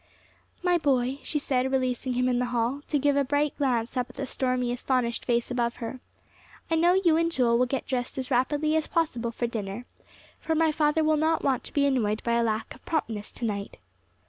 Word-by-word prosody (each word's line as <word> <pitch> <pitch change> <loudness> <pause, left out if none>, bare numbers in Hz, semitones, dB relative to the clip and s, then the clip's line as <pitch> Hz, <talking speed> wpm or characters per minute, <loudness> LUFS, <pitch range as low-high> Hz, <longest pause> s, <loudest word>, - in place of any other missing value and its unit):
"My 355 -1 +3
boy," 265 -2 +1
she 305 - -2
said, 265 -2 0
releasing 255 -1 0
him 250 +1 +1
in 245 -1 +1
the 250 - +1
hall, 245 +3 -1
to 300 - +1
give 285 0 +2
a 280 - +3
bright 290 +2 0
glance 250 -4 0
up 250 -1 -1
at - - -15
the 275 - -3
stormy, 255 -2 0
astonished 245 -1 -1
face 240 0 0
above 240 -1 0
her, 235 +2 -6 0.7
"I - - +4
know 340 +2 +4
you 345 -4 +4
and 335 0 +1
Joel 240 -6 +2
will 250 - +3
get 270 +1 -2
dressed 250 -1 -2
as 260 0 -4
rapidly 295 +5 +1
as 315 -1 +1
possible 270 -9 0
for 235 +1 -3
dinner, 220 0 -4 0.5
for 320 - -1
my 320 0 +3
father 305 +1 +2
will 310 0 +3
not 320 +2 +1
want 265 -3 +1
to - - -10
be 285 -1 +3
annoyed 225 -6 +1
by 235 - 0
a 235 - +3
lack 220 -1 -2
of 250 - -17
promptness 225 -10 -2
to 240 - -4
night." 200 -2 -4
255 Hz, 220 wpm, -27 LUFS, 240-295 Hz, 0.7 s, I